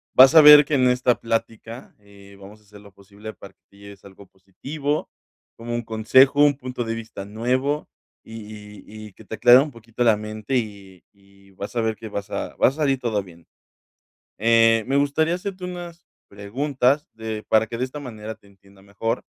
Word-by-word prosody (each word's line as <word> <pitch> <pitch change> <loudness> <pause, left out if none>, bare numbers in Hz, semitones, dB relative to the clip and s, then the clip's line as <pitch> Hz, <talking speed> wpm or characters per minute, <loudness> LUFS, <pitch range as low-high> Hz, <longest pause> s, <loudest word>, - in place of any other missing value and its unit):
vas 130 +4 +8
a 160 - +10
ver 150 -1 +9
que 145 - -1
en 130 -1 +3
esta 125 -1 +1
plática, 115 +1 -5
eh, 100 -1 -18
vamos 100 +2 -14
a - - -28
hacer 105 0 -17
lo 100 -1 -17
posible 100 +2 -12
para 95 -1 -14
que - - -60
te 100 - -23
lleves 100 -1 -14
algo 100 0 -15
positivo, 135 +11 -5 0.5
como 120 +1 -6
un 120 - -3
consejo, 130 +6 +3
un 145 -2 +4
punto 125 -2 -5
de 115 0 -3
vista 110 -3 -8
nuevo, 130 +7 -2 0.3
y 110 - -12 0.2
y 105 +1 -12
y 100 - -17
que - - -17
te 110 - -7
aclare 120 +2 +7
un 150 +2 -1
poquito 115 +1 -5
la 110 -2 +5
mente, 110 +4 -5
y 100 -5 -7
y 100 -1 -25
vas 100 +5 -9
a 115 - 0
ver 110 -1 -1
que 110 +2 -10
vas 100 0 -6
a 100 - -5
vas 130 - +2
a - - -16
salir 135 -2 +1
todo 110 -5 -2
bien. 85 -3 -17 0.9
Eh, 115 0 +3
me 135 +1 0
gustaría 155 +4 +1
hacerte 185 0 -6
unas 175 -1 -9 0.2
preguntas 130 +7 -1
de 110 -1 -6
para 110 0 +2
que 115 - -6
de 130 - -1
esta 145 +3 -8
manera 110 -4 -8
te 100 - -26
entienda 100 0 -23
mejor, 115 +4 -4
115 Hz, 200 wpm, -22 LUFS, 100-130 Hz, 0.9 s, a